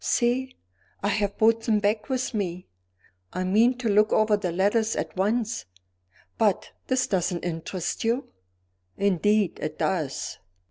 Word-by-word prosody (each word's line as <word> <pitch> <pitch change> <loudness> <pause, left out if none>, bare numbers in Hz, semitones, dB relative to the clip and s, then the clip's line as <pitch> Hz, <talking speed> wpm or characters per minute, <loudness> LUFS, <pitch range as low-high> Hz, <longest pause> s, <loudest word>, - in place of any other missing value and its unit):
See! 255 +2 +1 0.5
I 205 - +2
have 205 -1 0
brought 225 +1 +4
them 225 -2 +2
back 210 +1 0
with 260 -1 -1
me; 180 -4 -3 0.7
I 185 - -2
mean 225 +7 +3
to 250 -2 -3
look 210 +1 +4
over 215 -1 +4
the 195 -4 -2
letters 205 +5 +1
at - - -3
once 215 +4 0 0.7
but 210 -4 +1 0.2
this 255 -1 +2
doesn't 180 -2 -1
interest 170 +1 -3
you?" 235 +4 0 0.7
"Indeed 200 +1 +2
it 155 - -4
does." 160 -8 -2
210 Hz, 140 wpm, -26 LUFS, 185-230 Hz, 0.7 s, brought